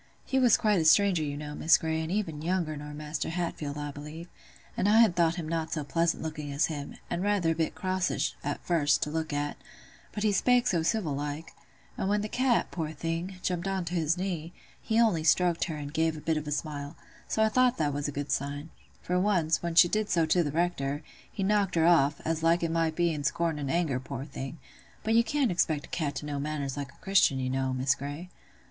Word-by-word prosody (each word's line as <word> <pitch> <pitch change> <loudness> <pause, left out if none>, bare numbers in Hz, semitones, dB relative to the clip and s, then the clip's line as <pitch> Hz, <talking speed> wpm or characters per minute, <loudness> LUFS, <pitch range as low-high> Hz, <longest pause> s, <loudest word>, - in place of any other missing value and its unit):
He 265 - +1
was 245 -4 +5
quite 210 -3 +2
a 160 - 0
stranger, 190 +1 +5
you 145 -1 -3
know, 150 0 -6
Miss 160 +2 +4
Grey, 160 0 -2
and 160 +1 -4
even 175 -7 -2
younger 170 -2 -1
nor 150 0 -7
Maister 150 +2 -4
Hatfield, 160 -4 -3
I 145 0 -4
believe; 150 +4 -9 0.5
and 200 - +1
I 220 +2 +6
had 220 -7 +5
thought 170 -1 +3
him 170 -4 -5
not 160 0 -2
so 155 -2 -2
pleasant 165 +3 0
looking 155 -2 -5
as 140 +3 +2
him, 145 -1 -6
and 175 - -2
rather 200 -4 +2
a - - -1
bit 160 -1 -1
crossish, 185 -1 -1
at 145 0 -4
first, 155 -4 +2
to 150 - -3
look 160 0 -2
at; 145 0 -2 0.5
but 210 - -4
he 215 - +3
spake 245 +4 +3
so 175 -8 +2
civil 170 -3 0
like—and 150 +6 -6
when 205 0 +1
th' 215 - -5
cat, 255 -1 +1
poor 160 -3 -3
thing, 165 +4 -3
jumped 180 0 -1
on 190 -2 -1
to 170 - -5
his 165 -1 +1
knee, 175 -3 -3 0.3
he 225 0 +1
only 210 -9 +3
stroked 170 +1 +3
her, 165 -4 -4
and 145 -1 -6
gave 160 -1 +1
a - - -6
bit 160 +1 0
of 155 -1 -3
a - - -3
smile: 145 0 -4 0.3
so 220 - +1
I 220 - +4
thought 250 +2 +3
that 150 -3 0
was 145 +1 -2
a - - -3
good 145 +1 -4
sign; 145 +3 -3 0.3
for 180 0 0
once, 180 -5 +2
when 170 -1 -3
she 175 - +8
did 215 +3 -1
so 165 -2 +3
to 175 +2 +3
th' 145 - -2
Rector, 150 -3 -1 0.3
he 195 - -3
knocked 200 -2 +1
her 165 -1 +3
off, 150 -4 +4 0.2
like 165 +1 +3
as - - +2
it - - -4
might 165 -1 0
be 170 -1 +2
in 150 -1 -4
scorn 160 +2 0
and 140 -2 -3
anger, 160 -5 0
poor 135 0 -6
thing. 135 +1 -7 0.5
But 220 +1 +1
you 230 +1 +5
can't 265 -1 +1
expect 155 -4 0
a - - -19
cat 145 -5 -2
to 150 - -5
know 145 -1 -3
manners 140 -2 -3
like 140 -1 -5
a - - -25
Christian, 190 -8 +4
you 130 0 -2
know, 130 0 0
Miss 130 +1 +2
Grey." 145 +6 -7
160 Hz, 235 wpm, -29 LUFS, 145-180 Hz, 0.5 s, she